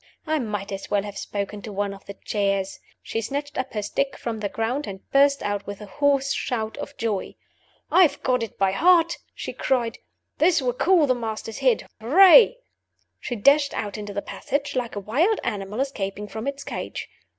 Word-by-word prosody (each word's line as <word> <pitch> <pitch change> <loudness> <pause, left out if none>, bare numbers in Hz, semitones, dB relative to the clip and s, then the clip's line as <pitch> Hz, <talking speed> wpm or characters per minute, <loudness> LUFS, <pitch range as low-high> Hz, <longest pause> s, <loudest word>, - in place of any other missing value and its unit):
I 310 -1 +1
might 210 -5 -4
as 195 0 -6
well 200 -1 +1
have 205 -1 -7
spoken 205 0 -4
to 215 - -7
one 200 0 -2
of 195 - -14
the 200 - -7
chairs. 195 -2 -1 0.2
She 225 - -3
snatched 285 +5 -4
up 260 0 -3
her 210 - -1
stick 275 +6 -1
from 230 -2 -4
the 205 -1 -2
floor, 230 +7 -1
and 195 -1 -9
burst 280 0 +4
out 205 -1 -2
with 205 -1 -6
a 210 - -8
hoarse 275 +5 +1
shout 220 -3 -2
of - - -7
joy. 215 -4 -2 0.6
"I've 365 -5 +4
got 250 -1 +2
it 225 - -5
by 195 -1 +2
heart!" 340 - +4 0.2
she - - -5
cried. 240 -4 0 0.4
"This 335 +2 +4
will 250 -3 0
cool 340 +4 +4
the 255 - +3
Master's 225 -2 -5
head! - - +2
Hooray!" 380 - +7 0.6
She 245 - -4
dashed 280 +6 +4
out 205 -2 -3
into 205 -1 -6
the 200 0 -3
passage 285 0 -3
like 245 -3 -2
a - - -2
wild 300 - +1
animal 205 +1 -3
escaping 210 -7 -3
from 220 +5 -6
its 280 0 -4
cage. - - -5
230 Hz, 195 wpm, -24 LUFS, 205-280 Hz, 0.6 s, Hooray